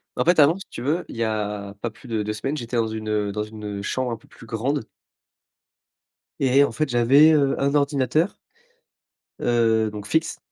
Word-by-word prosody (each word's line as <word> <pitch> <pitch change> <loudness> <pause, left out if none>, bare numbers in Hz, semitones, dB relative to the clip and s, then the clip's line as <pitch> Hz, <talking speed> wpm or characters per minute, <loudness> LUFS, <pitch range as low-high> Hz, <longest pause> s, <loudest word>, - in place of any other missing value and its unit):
En - - +1
fait, 175 -1 +3
avant, 155 +5 +6
si 195 - -10
tu - - -8
veux, 155 +7 0
il - - -8
y 115 - 0
a 105 -2 -3
pas 120 - -3
plus 125 - -16
de 110 -2 -1
2 105 - -3
semaines, 135 +8 -3
j'étais 120 -3 -4
dans 115 -1 +2
une 110 0 -5
heu 105 -1 0
dans 105 +1 -2
une, 105 0 -9
heu, - - -5
chambre 125 +4 -2
un 115 - -3
peu - - -23
plus 115 - -15
grande 120 +3 -2 1.5
et 135 +1 +4
en - - 0
fait 155 -1 -1
j'avais, 135 +6 +6
heu, 140 -2 +2
un 140 +1 +1
ordinateur 145 - +1 1.0
heu, 115 -2 +2
donc 105 -1 -7
fixe. 160 +5 0
120 Hz, 205 wpm, -23 LUFS, 110-140 Hz, 1.5 s, avant